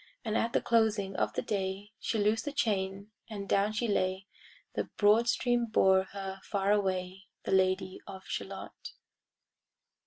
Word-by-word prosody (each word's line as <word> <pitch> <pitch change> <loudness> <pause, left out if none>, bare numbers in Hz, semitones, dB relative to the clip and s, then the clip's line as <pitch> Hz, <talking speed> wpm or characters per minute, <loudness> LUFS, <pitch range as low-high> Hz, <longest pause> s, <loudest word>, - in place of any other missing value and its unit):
And 220 -1 -1
at 230 +1 +1
the - - +2
closing 215 -4 +2
of - - 0
the - - -2
day 195 0 -3
She 225 - -1
loosed 215 +2 +1
the 290 - -2
chain, 200 -5 -1 0.2
and 200 -2 -6
down 200 +2 +2
she 225 +2 -1
lay; 190 -2 0 0.5
The - - -1
broad 215 +3 +5
stream 240 -1 +1
bore 190 -3 +4
her 195 0 -6
far 200 -1 0
away, 190 -2 -1 0.2
The - - -3
Lady 185 0 +2
of 190 -1 -9
Shalott. - - -6
200 Hz, 155 wpm, -31 LUFS, 190-220 Hz, 0.5 s, broad